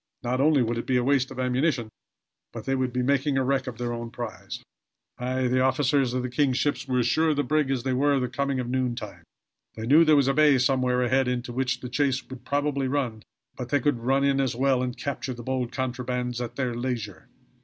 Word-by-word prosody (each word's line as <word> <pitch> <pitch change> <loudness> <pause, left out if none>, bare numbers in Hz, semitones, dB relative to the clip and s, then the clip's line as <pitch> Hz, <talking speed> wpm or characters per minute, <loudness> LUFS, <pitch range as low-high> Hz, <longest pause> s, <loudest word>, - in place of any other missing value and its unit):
Not 125 +2 0
only 145 -3 +4
would 115 0 -1
it - - -6
be 130 - +2
a 125 - +1
waste 135 0 +2
of 130 - -8
ammunition, 125 -1 0 0.6
but - - -8
they 135 - 0
would 130 -1 0
be 125 0 -1
making 140 +1 +1
a 135 - +2
wreck 130 0 0
of 120 -3 -5
their 120 -1 -3
own 120 0 -5
prize. 115 -3 -7 0.6
Aye, 130 +1 -1
the 130 +1 +2
officers 130 -1 +2
of 130 - -1
the - - -1
king's 130 -1 +1
ship 145 0 +1
were 130 -1 0
as 125 - +2
sure 160 +7 +2
of 155 - +2
the 145 - +1
brig 150 +1 +1
as 130 -3 -1
they 130 -1 0
were 140 +3 +2
of 135 - +1
the 125 - 0
coming 140 -1 -2
of 125 - -3
noontime. 125 -1 -3 0.5
They 110 - -5
knew 150 +7 +6
there 155 -2 +5
was 140 -2 +3
a 135 - +3
bay 150 -1 +5
somewhere 125 -1 +2
ahead 130 +1 +2
into 125 -1 -2
which 130 0 -1
the 125 - -5
chase 130 +1 0
would 130 -1 -9
probably 140 -1 0
run; 130 -5 -2 0.3
but 125 -2 -6
they 145 +2 +2
could 135 -2 0
run 135 +4 +1
in 140 -1 +2
as 130 -3 -1
well 130 0 +2
and 125 -1 -3
capture 135 -2 -4
the 120 - -9
bold 130 -1 -2
contrabandists 125 -1 -3
at 120 - -5
their 130 -3 -1
leisure. 115 -8 -4
130 Hz, 240 wpm, -26 LUFS, 125-140 Hz, 0.6 s, knew